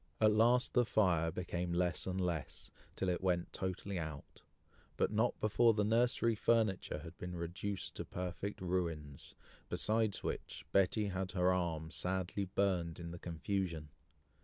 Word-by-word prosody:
At 110 -1 +5
last 120 +4 +4
the 125 - +5
fire 90 -8 +3
became 90 0 -3
less 90 +1 +1
and 95 0 -1
less, 85 -5 -3 0.2
till 95 - -1
it 90 -1 0
went 90 -2 0
totally 95 0 -3
out, 75 -3 -7 0.6
but - - +2
not 110 +3 +1
before 115 +1 +4
the 105 - +2
nursery 115 +2 +3
furniture 110 -5 +1
had 85 +1 -9
been 90 0 -5
reduced 90 +4 -4
to - - -3
perfect 90 +3 -4
ruins, 85 -6 -3 0.3
besides 110 -1 +1
which, - - -4
Betty 100 +2 +3
had 95 -1 -3
her 90 -1 +3
arm 80 -3 -1
sadly 95 +3 -1
burned 90 -3 0
in 85 0 -6
the 85 - -7
confusion. 85 -2 -2
95 Hz, 150 wpm, -36 LUFS, 85-105 Hz, 0.6 s, At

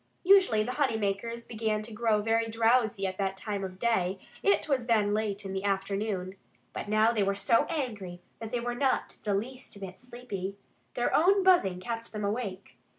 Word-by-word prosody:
Usually 370 - +5
the 245 - -3
honey 260 -5 +1
makers 220 +3 -2
began 215 -2 -2
to 225 +1 -9
grow 215 -1 +1
very 225 +1 +1
drowsy 225 -2 +2
at 185 0 -3
that 195 -1 -1
time 200 0 -4
of 185 -1 -6
day 190 -4 +1 0.2
(it 200 +1 +2
was 260 -5 0
then 210 -3 +3
late 210 -1 -2
in 190 - -4
the 190 0 -3
afternoon). 195 -1 -2 0.4
But - - -5
now 215 +2 +4
they 220 -3 0
were 195 0 +1
so 205 +4 +3
angry 215 - -4 0.2
that 225 -1 -6
they 245 - -1
were 240 +1 -2
not 265 +1 0
the 205 -1 +1
least 250 +1 -5
bit 190 -2 -8
sleepy. 220 -6 -6 0.4
Their 240 - +1
own 385 +5 +4
buzzing 345 - +4
kept 230 +4 -5
them 210 -1 -3
awake. 200 -3 -4
215 Hz, 190 wpm, -29 LUFS, 195-235 Hz, 0.4 s, Usually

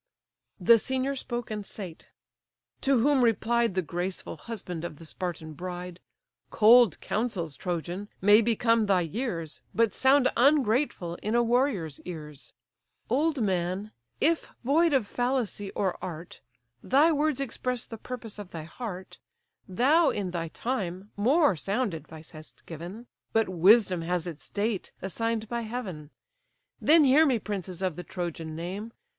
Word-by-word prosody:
The 230 +5 +6
senior 265 +4 -1
spoke 240 -3 -4
and 210 -1 -3
sate. 190 -4 -7 0.7
To 270 -3 +3
whom 275 0 +4
replied 230 -2 +2
The 185 - +1
graceful 175 +3 -3
husband 180 -7 -6
of 175 - -5
the 165 - -11
Spartan 160 -2 -5
bride: 180 +2 -6 0.5
"Cold 225 -3 +6
counsels, 190 - -2
Trojan, 175 +5 -4
may 205 +3 +6
become 230 -1 +2
thy 190 -2 +3
years 170 - -4
But 230 -1 +3
sound 265 0 +4
ungrateful 245 - +2
in 215 +3 -1
a 240 - +4
warrior's 235 - 0
ears: 150 -5 -9 0.6
Old 290 0 +2
man, 185 +2 -1 0.3
if 325 +2 +2 0.2
void 315 +6 +3
of 260 -6 +3
fallacy 245 -4 -1
or 190 -3 0
art, 170 -1 -7 0.4
Thy 290 +6 +4
words 300 -2 +1
express 250 -2 -3
the 225 - -9
purpose 230 -4 -7
of 205 -3 -8
thy 165 -3 -7
heart, 185 +2 -8 0.5
Thou, 280 - +4
in 195 -3 -2
thy 170 -1 -3
time, 195 -1 -4
more 265 - +3
sound 200 +6 -1
advice 160 0 -10
hast 155 -1 -14
given; 175 +8 -8 0.3
But 225 0 +3
wisdom 185 +1 +5
has 175 0 -1
its 165 -4 -8
date, 205 -1 -2
assign'd 225 +3 -2
by 235 +1 -2
heaven. 210 -10 -6 0.7
Then 315 +1 +6
hear 280 +3 +6
me, 270 -6 +3
princes 195 -4 -5
of 185 -4 0
the 180 - -6
Trojan 170 -4 -5
name! 190 +7 -5
210 Hz, 145 wpm, -28 LUFS, 175-245 Hz, 0.7 s, The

